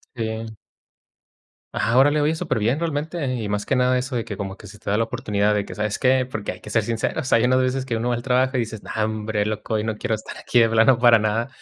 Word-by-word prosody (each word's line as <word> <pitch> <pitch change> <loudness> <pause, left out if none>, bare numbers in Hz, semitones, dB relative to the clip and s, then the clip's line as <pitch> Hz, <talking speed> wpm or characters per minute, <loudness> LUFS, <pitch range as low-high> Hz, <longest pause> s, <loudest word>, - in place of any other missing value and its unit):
Sí. 110 -1 -4 1.2
Ajá, 115 +1 0
órale. 145 +3 +4
Oye, 150 +2 +2
superbién 120 -2 0
realmente. 155 -3 -2
Y 110 -4 -3
más 105 0 -1
que 135 - 0
nada 125 0 +3
eso 125 +1 -2
de 115 - -1
que - - -6
como 95 -2 -5
que - - -13
se 105 +2 -13
te - - -4
da 105 - +2
la 115 - +2
oportunidad 105 -2 0
de 105 -1 0
que, - - -9
¿sabes 105 0 -2
qué? 130 -1 +3
Porque 110 -5 -4
hay - - -12
que - - -11
ser 110 +1 +1
sinceros, 115 +4 -2
hay 115 - +5
unas 130 +1 +3
veces 130 +1 0
que 120 -3 -1
uno 115 +2 -1
va 120 - +1
al 120 - -5
trabajo 130 +1 +2
y - - +2
dices: 110 -2 -5
"No, - - -10
hombre 110 -1 -2
loco, 110 +1 -3
hoy 105 -1 0
no 110 -1 -2
quiero 110 0 -1
estar 110 - -10
aquí 125 - 0
de 115 -1 +5
plano 115 +2 +4
para 120 -2 +6
nada". 110 +3 0
115 Hz, 265 wpm, -22 LUFS, 110-130 Hz, 1.2 s, para